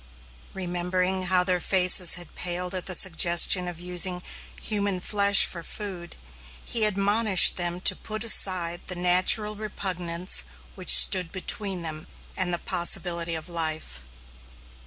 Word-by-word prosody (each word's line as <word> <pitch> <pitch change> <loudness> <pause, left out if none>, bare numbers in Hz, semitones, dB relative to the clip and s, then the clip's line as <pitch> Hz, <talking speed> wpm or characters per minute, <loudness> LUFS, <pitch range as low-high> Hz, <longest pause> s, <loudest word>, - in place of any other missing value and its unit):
Remembering 180 +1 -4
how 180 0 0
their 180 -1 -2
faces 180 -1 +3
had 175 -2 -8
paled 180 +1 -5
at 185 0 -6
the 185 - -1
suggestion 175 +1 +3
of 175 -2 -9
using 180 0 0 0.4
human 200 -3 -4
flesh 200 +1 +3
for 170 - -7
food, 180 -1 -7 0.5
he 225 -2 0
admonished 205 0 +3
them 175 0 -5
to - - +3
put 215 0 -7
aside 180 -6 0
the 180 - -4
natural 185 +4 +1
repugnance 180 - -3 0.3
which - - -5
stood 165 - +5
between 190 -1 -3
them 155 -1 -6 0.3
and 180 -1 -3
the 175 - 0
possibility 170 -1 -1
of 160 +1 -8
life. 160 - -5
180 Hz, 135 wpm, -23 LUFS, 175-195 Hz, 0.5 s, stood